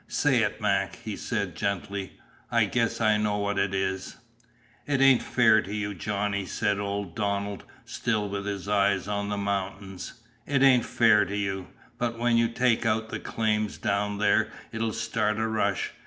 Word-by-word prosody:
"Say 135 Hz, -5 st, +2 dB
it, 105 Hz, 0 st, -1 dB
Mac," 100 Hz, -3 st, 0 dB
he 105 Hz, +2 st, -6 dB
said 100 Hz, -7 st, -3 dB
gently. 100 Hz, +1 st, -3 dB, 0.4 s
"I -, -, +4 dB
guess -, -, 0 dB
I 110 Hz, -2 st, +3 dB
know 105 Hz, -1 st, 0 dB
what 100 Hz, -1 st, -1 dB
it 100 Hz, -, +1 dB
is." 95 Hz, 0 st, -2 dB, 0.7 s
"It 140 Hz, -2 st, +1 dB
ain't 135 Hz, -2 st, +6 dB
fair 110 Hz, -3 st, +4 dB
to 100 Hz, -, -8 dB
you, 105 Hz, -1 st, -2 dB
Johnny," 100 Hz, +1 st, -2 dB
said 100 Hz, +2 st, 0 dB
old 100 Hz, -3 st, -3 dB
Donald, 100 Hz, -1 st, -2 dB, 0.2 s
still 105 Hz, -3 st, -1 dB
with 100 Hz, 0 st, -4 dB
his 100 Hz, -1 st, -4 dB
eyes 100 Hz, -2 st, +2 dB
on 100 Hz, 0 st, -2 dB
the 105 Hz, -, -2 dB
mountains. 100 Hz, -1 st, -4 dB, 0.3 s
"It 140 Hz, -1 st, +2 dB
ain't 130 Hz, -3 st, +5 dB
fair 110 Hz, -3 st, +4 dB
to 100 Hz, -, -4 dB
you. 95 Hz, -2 st, -2 dB, 0.3 s
But 115 Hz, -1 st, -1 dB
when 120 Hz, 0 st, +2 dB
you 115 Hz, 0 st, +4 dB
take 120 Hz, 0 st, +1 dB
out 110 Hz, -1 st, 0 dB
the -, -, -4 dB
claims 105 Hz, -2 st, -1 dB
down 100 Hz, 0 st, -1 dB
there 105 Hz, 0 st, +3 dB, 0.2 s
it'll 115 Hz, 0 st, -1 dB
start 105 Hz, -1 st, -1 dB
a 110 Hz, -, 0 dB
rush. 105 Hz, -3 st, 0 dB
105 Hz, 175 wpm, -27 LUFS, 100-110 Hz, 0.7 s, ain't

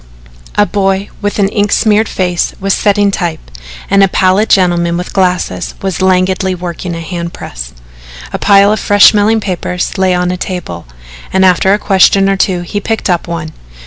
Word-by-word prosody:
A 205 Hz, -, +3 dB
boy 195 Hz, -1 st, -1 dB
with 205 Hz, 0 st, -2 dB
an 200 Hz, -2 st, +2 dB
ink 205 Hz, 0 st, -1 dB
smeared 215 Hz, 0 st, +2 dB
face 180 Hz, -2 st, -1 dB
was 195 Hz, 0 st, 0 dB
setting 205 Hz, -1 st, +1 dB
type 170 Hz, -, -4 dB, 0.4 s
and 200 Hz, 0 st, +3 dB
a 195 Hz, -, +5 dB
pallid 190 Hz, +3 st, +1 dB
gentleman 175 Hz, -2 st, +2 dB
with 180 Hz, -, -6 dB
glasses 180 Hz, -, -1 dB
was 190 Hz, -2 st, -2 dB
languidly 185 Hz, 0 st, +1 dB
working 175 Hz, 0 st, -6 dB
a 165 Hz, -, -6 dB
hand 170 Hz, 0 st, -5 dB
press. -, -, -8 dB, 0.6 s
A -, -, -3 dB
pile 200 Hz, 0 st, +4 dB
of 215 Hz, -, -2 dB
fresh 205 Hz, -1 st, +5 dB
smelling 215 Hz, +1 st, +2 dB
papers 180 Hz, -2 st, -3 dB
lay 185 Hz, -1 st, +2 dB
on 180 Hz, 0 st, 0 dB
a 180 Hz, -, -3 dB
table, 160 Hz, -, -6 dB, 0.4 s
and 190 Hz, 0 st, +3 dB
after 185 Hz, +1 st, +3 dB
a 205 Hz, -, +3 dB
question 195 Hz, -1 st, +3 dB
or 195 Hz, -, +1 dB
two 185 Hz, -2 st, 0 dB
he 175 Hz, +4 st, -4 dB
picked 220 Hz, -2 st, -2 dB
up 175 Hz, 0 st, -1 dB
one. 165 Hz, -2 st, -5 dB
190 Hz, 180 wpm, -12 LUFS, 175-200 Hz, 0.6 s, a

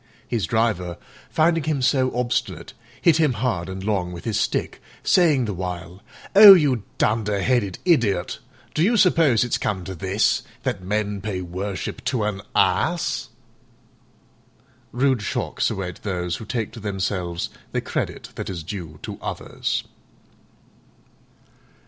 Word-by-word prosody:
His 110 Hz, -8 st, -1 dB
driver, 90 Hz, -5 st, 0 dB, 0.3 s
finding 160 Hz, -1 st, +2 dB
him 155 Hz, -3 st, 0 dB
so 130 Hz, 0 st, +2 dB
obstinate, 125 Hz, -1 st, -2 dB, 0.3 s
hit 165 Hz, -2 st, +5 dB
him 155 Hz, -5 st, +3 dB
hard 105 Hz, -6 st, -2 dB
and 95 Hz, 0 st, -6 dB
long 95 Hz, -4 st, -1 dB
with 85 Hz, -1 st, -9 dB
his 110 Hz, -4 st, 0 dB
stick, -, -, -1 dB, 0.2 s
saying 155 Hz, -9 st, +4 dB
the 105 Hz, -, -3 dB
while, 90 Hz, 0 st, -6 dB, 0.3 s
"Oh, 200 Hz, -1 st, +12 dB
you 140 Hz, -, +2 dB, 0.2 s
dunder 105 Hz, -2 st, +1 dB
headed 110 Hz, -7 st, +1 dB
idiot, 115 Hz, -, +2 dB, 0.3 s
do 155 Hz, -, 0 dB
you 225 Hz, +7 st, +3 dB
suppose 165 Hz, -, +4 dB
it's 120 Hz, -, -1 dB
come 95 Hz, -3 st, -2 dB
to 95 Hz, -, -6 dB
this, 95 Hz, +4 st, +1 dB, 0.2 s
that 90 Hz, -, -2 dB
men 105 Hz, +1 st, -2 dB
pay 95 Hz, -2 st, -3 dB
worship 95 Hz, +4 st, -5 dB
to 125 Hz, -4 st, 0 dB
an 105 Hz, -2 st, -2 dB
Ass?" 160 Hz, -, +1 dB, 1.6 s
Rude 130 Hz, -1 st, +1 dB
shocks -, -, -1 dB
await 90 Hz, -2 st, -5 dB
those 90 Hz, -3 st, -2 dB
who 110 Hz, -, -9 dB
take 115 Hz, -1 st, -3 dB
to 115 Hz, -, -10 dB
themselves 95 Hz, -4 st, -2 dB, 0.2 s
the -, -, 0 dB
credit -, -, -4 dB
that -, -, -5 dB
is 85 Hz, -4 st, -5 dB
due 85 Hz, -4 st, -7 dB
to -, -, -6 dB
others. -, -, -3 dB
105 Hz, 140 wpm, -23 LUFS, 95-130 Hz, 1.6 s, Oh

